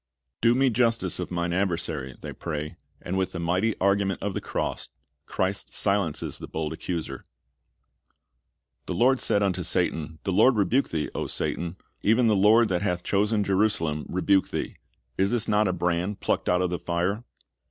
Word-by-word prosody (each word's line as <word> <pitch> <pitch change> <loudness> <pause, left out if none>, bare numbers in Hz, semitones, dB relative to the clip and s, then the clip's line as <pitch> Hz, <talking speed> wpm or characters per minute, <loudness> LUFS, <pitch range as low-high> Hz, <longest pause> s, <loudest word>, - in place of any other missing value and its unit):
"Do 115 +1 +4
nie 135 0 +3
justice 115 -6 +1
of 90 - -3
mine 85 -1 -1
adversary," 85 -8 -1
they - - -7
pray; 75 -2 -5 0.3
and 95 +2 -2
with 95 - -1
the - - -4
niighty 90 +6 +1
argument 100 -1 +1
of 100 -1 -1
the - - -3
cross, - - -3 0.4
Christ 95 +1 -2
silences 100 -6 0
the - - -7
bold 80 0 -3
accuser. 85 0 -5 1.6
"The - - -2
Lord 130 +2 +4
said 100 - +2
unto 95 -2 0
Satan, 80 -2 -1
The 95 - -1
Lord 130 +7 +5
rebuke 110 +7 +2
thee, 80 -2 -2
O - - -3
Satan, 85 0 -2 0.3
e\"en 115 +4 +4
the 110 -2 +4
Lord 110 +4 +5
that 90 -1 0
hath 90 -3 -1
chosen 105 +1 +1
Jerusalem 95 -6 0
rebuke 95 +2 +2
thee: - - -4 0.4
is 95 +1 +2 0.2
not 105 0 +3
this - - +1
a - - 0
brand 90 +3 -1
plucked - - 0
out 90 0 +3
of 90 - -1
the 90 - -2
fire?" 90 +6 -1
95 Hz, 175 wpm, -26 LUFS, 85-105 Hz, 1.6 s, Lord